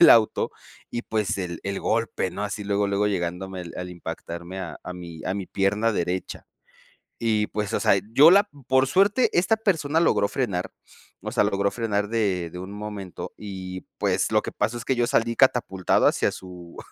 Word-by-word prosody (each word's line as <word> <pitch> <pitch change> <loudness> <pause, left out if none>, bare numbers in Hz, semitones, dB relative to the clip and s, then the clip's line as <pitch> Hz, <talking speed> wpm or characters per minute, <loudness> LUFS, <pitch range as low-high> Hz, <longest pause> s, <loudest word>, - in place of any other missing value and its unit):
del 170 - +9
auto, 110 -2 +4 0.4
y, 120 - -3
pues, 105 -3 -1
el 85 -3 -4
el 100 0 -2
golpe, 115 -4 0
¿no? 100 +3 -4
Así 105 0 -4
luego, 100 0 +1
luego 100 +1 +1
llegándome 90 0 -3
al 90 0 -5
impactarme 85 +1 -7
a 90 - -6
a 90 - -6
mi 85 -2 -9
a 95 - -1
mi 95 -3 -4
pierna 105 +3 +1
derecha, 90 0 -3 0.7
y, 110 -2 +1
pues, 105 -1 -3
o - - +1
sea, - - +5 0.2
yo 150 +6 +8
la 200 +2 +7 0.2
por 130 0 +4
suerte 200 - +3
esta 190 +6 +3
persona 165 -7 +1
logró 100 -11 +3
frenar, 100 -9 -2 0.5
o - - -5
sea, - - +3
logró 100 0 +1
frenar 105 -3 -1
de 95 -7 0
de 90 - -7
un 95 +2 -7
momento. 105 -3 -7
Y, 95 -3 -6 0.2
pues, - - +1
lo - - +4
que - - -5
pasa 120 +2 -1
es 120 - -7
que 130 - +1
yo 120 0 +1
salí 115 0 +1
catapultado 115 -8 +3
hacia - - +2
su 90 -2 -10
100 Hz, 190 wpm, -25 LUFS, 90-115 Hz, 0.7 s, del